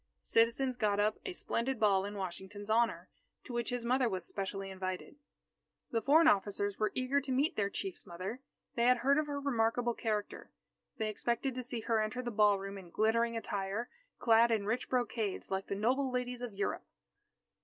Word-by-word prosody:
The - - -27
citizens 240 +3 +2
got 210 -3 +1
up 210 +1 +2
a 375 - -3
splendid 260 -6 -2
ball 195 -3 +3
in 205 +1 -5
Washington's 195 +3 -5
honour, 230 +1 +2 0.4
to 250 - -8
which 240 -1 -1
his 245 -1 -3
mother 250 0 +3
was 185 -4 -3
specially 195 0 -4
invited. 185 +7 -5 0.7
The 230 - +1
foreign 315 +5 +6
officers 200 -3 +1
were 215 - +1
eager 260 +2 +1
to 270 - -5
meet 275 +5 +2
their 200 -2 +1
Chief's 195 -2 -5
mother. 185 +8 -5 0.3
They 235 - +1
had 250 0 +6
heard 280 +2 +5
of 305 - -1
her 285 -1 -2
remarkable 240 -3 +1
character. 215 -3 -3 0.5
They 220 -2 -1
expected 235 +5 -1
to 255 - -4
see 245 -2 -4
her 225 -1 +1
enter 215 +4 -2
the 240 - -3
ballroom 200 -2 +2
in 180 -2 -12
glittering 230 +4 +2
attire, 205 +1 -3 0.3
clad 230 0 +5
in 220 -3 +1
rich 225 +4 -1
brocades, 235 -7 -1
like 190 0 -2
the - - -2
noble 255 +6 +1
ladies 250 -1 -2
of 245 -2 -4
Europe. 200 0 -3
225 Hz, 185 wpm, -33 LUFS, 200-250 Hz, 0.7 s, foreign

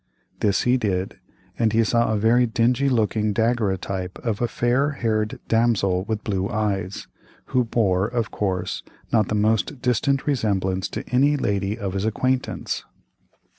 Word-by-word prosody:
This 100 -2 +2
he 125 +1 +3
did, 95 -5 -2 0.4
and 110 -2 +2
he 115 +1 +4
saw 115 +1 +2
a 110 - +1
very 120 +4 +3
dingy 125 +4 +2
looking 110 -3 +1
daguerreotype 100 -5 -1
of 115 -2 -1
a 120 - +2
fair 125 +6 +1
haired 110 -4 -1
damsel 105 -5 +2
with 110 -1 -3
blue 95 -1 -1
eyes, 100 -4 -2 0.5
who 125 -1 +4
bore, 100 -5 +1
of 115 -1 -2
course, 95 -3 -2 0.3
not 110 -3 +3
the 105 - -1
most 110 +6 +1
distant 135 +3 +1
resemblance 95 -9 0
to - - -6
any 140 +3 +4
lady 100 -3 -1
of 100 -4 -4
his 100 +1 -1
acquaintance. 130 +4 -1
110 Hz, 150 wpm, -23 LUFS, 100-120 Hz, 0.5 s, he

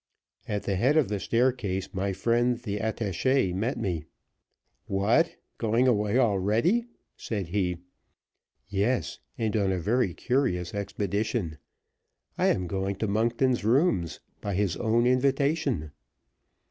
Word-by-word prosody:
At 105 -1 -2
the 100 -2 -1
head 135 +10 +3
of 145 -9 +3
the 105 -1 -1
staircase 115 -6 0
my 100 +1 -1
friend, 120 +5 +1
the 105 -4 -4
attache, 110 0 0
met 110 +8 -1
me. 90 -8 -2 0.8
"What! 110 - +2 0.2
going 115 +3 +2
away 105 -1 +2
already?" 115 - +2 0.3
Said 100 -6 -4
he. 90 -2 0 0.9
"Yes; 105 +5 -1 0.2
and 110 -3 -1
on 100 -3 +2
a 95 - 0
very 105 +1 +1
curious 120 -10 0
expedition. 100 -3 -2 0.8
I - - +2
am 95 - +1
going 95 +2 -2
to 110 +3 -2
Monkton's 115 +4 +1
rooms, 110 - +2 0.2
by 100 -2 -2
his 100 -3 +1
own 115 +1 +2
invitation." 135 - +1
105 Hz, 125 wpm, -27 LUFS, 95-125 Hz, 0.9 s, head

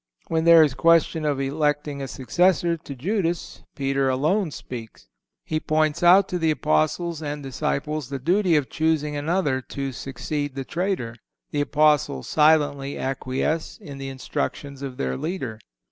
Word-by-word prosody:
(162) - - -5
When 160 0 +1
there 160 - +9
is 145 -4 +1
question 165 0 +3
of 145 -2 0
electing 145 0 -1
a 135 - -4
successor 170 +7 +1
to 155 -4 -9
Judas 175 - -2
Peter 135 -1 0
alone 160 +9 +1
speaks. 115 - -9 0.4
He 155 - -1
points 155 0 +1
out 180 +3 +6
to 180 - -2
the 165 -1 +2
Apostles 155 - 0
and 145 -1 -4
disciples 150 +1 -2
the 140 - -3
duty 175 +5 +2
of 145 -3 +2
choosing 155 -2 0
another 145 -2 0
to 135 +1 -5
succeed 140 +2 -4
the 135 -1 -4
traitor. 170 - -2 0.3
The 145 - 0
Apostles 150 - +2
silently 145 -3 +2
acquiesce 135 +4 -2
in 140 -2 -10
the 135 0 -5
instructions 135 +1 -4
of 135 -2 -6
their 65 0 -2
leader. 130 - -4
150 Hz, 155 wpm, -24 LUFS, 135-160 Hz, 0.4 s, there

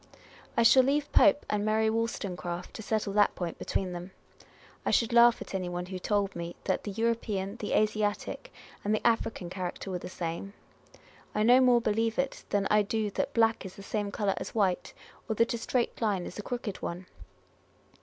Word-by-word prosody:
I 235 - +5
shall 260 +3 +8
leave 285 +3 0
Pope 295 -1 +5
and 210 -1 0
Mary 215 +1 +2
Wolstonecraft 190 -6 -3
to - - -7
settle 215 -2 -1
that 205 0 +3
point 175 -2 -4
between 185 -2 -2
them. 175 +1 -6 0.7
I - - 0
should 230 0 +2
laugh 235 0 +7
at - - -12
any 185 -2 -2
one 175 0 -3
who 185 0 -6
told 200 0 0
me 170 0 -5
that - - -1
the - - -3
European, 215 -2 -1
the 210 - -3
Asiatic, 215 - 0 0.3
and 210 +1 +2
the - - -4
African 225 -5 0
character 185 +1 -5
were 180 - -2
the - - -7
same. 175 +3 -5 0.8
I 210 - +2
no 245 +3 +6
more 245 -2 +5
believe 225 +1 0
it 270 0 -2
than 200 -1 +1
I 210 0 +5
do 210 0 -1
that - - -2
black 225 -1 +3
is 190 -2 -8
the 200 - -10
same 205 0 -2
colour 200 -1 0
as - - -6
white, 195 -5 +1 0.4
or 220 - 0
that 230 +2 +2
a - - -1
straight 245 +1 -1
line 200 -5 0
is 185 - -8
a - - -1
crooked 225 -3 -4
one. 175 +2 -5
210 Hz, 195 wpm, -29 LUFS, 190-230 Hz, 0.8 s, shall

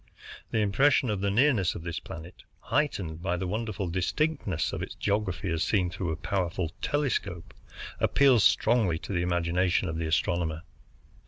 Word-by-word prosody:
The - - -1
impression 125 +4 +3
of 100 -2 -2
the 100 - +1
nearness 115 - +3
of 80 - -7
this 85 -1 -4
planet, 85 +2 -10 0.2
heightened 95 - -1
by 90 -1 -1
the 95 - -3
wonderful 105 0 -3
distinctness 95 - -1
of - - -3
its - - -6
geography 100 -3 -1
as 80 0 -1
seen 90 -4 +1
through 90 -1 -3
a 80 - -1
powerful 90 -1 -2
telescope, 110 - -2 0.5
appeals 130 -6 +4
strongly 110 -8 +3
to 100 - -6
the 85 - +1
imagination 90 +1 +1
of 80 0 -3
the 80 - -1
astronomer. 85 -1 0
95 Hz, 160 wpm, -28 LUFS, 85-110 Hz, 0.5 s, appeals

